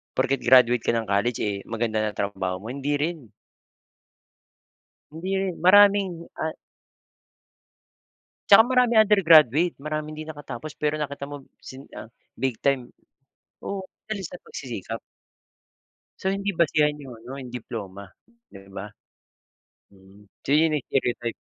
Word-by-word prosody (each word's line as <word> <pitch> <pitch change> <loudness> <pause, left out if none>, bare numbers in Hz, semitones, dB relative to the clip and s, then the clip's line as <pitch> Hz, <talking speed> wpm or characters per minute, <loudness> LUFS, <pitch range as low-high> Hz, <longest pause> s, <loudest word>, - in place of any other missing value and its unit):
porket 135 0 +1
graduate 125 -1 +5
ka - - +2
ng 110 -3 -2
college, 110 +4 +1
eh, 100 -2 -2
maganda 115 -1 -1
na 110 -1 -2
trabaho 95 -2 -2
mo 105 +6 -7
hindi 140 +2 -2
rin. 150 -2 -3 1.8
Hindi 165 +5 -6
rin, 190 -2 -2
maraming, 195 -2 +5 0.2
ah 160 0 -2 1.9
Tsaka 200 - +10
maraming 245 -2 +4
undergraduate, 170 - +5
maraming 155 0 -4
hindi 155 +1 -8
nakatapos 145 -1 -8
pero 150 0 -1
nakita 140 -1 -4
mo 145 0 -8 0.2
sin 135 +2 -12
ah, - - -7 0.3
big 130 -2 -2
time, 135 -3 0 0.7
oo, 200 -1 -3 0.2
dahil 215 -2 -4
sa 180 +1 -7
pagsisikap. 115 - -7 1.2
So, 190 - 0
hindi 200 0 -2
basehan 150 -2 +2
yung 125 -4 -10
ano, 125 +4 -9
yung 130 -3 -8
diploma, 100 -5 -7 0.4
di 95 -1 -15
ba? 100 +2 -7 1.0
Mm, 100 +1 -20 0.2
so - - -7
yun, 155 0 +4
eh, 140 - -6
stereotype. 120 -3 -1
140 Hz, 130 wpm, -25 LUFS, 115-165 Hz, 1.9 s, Tsaka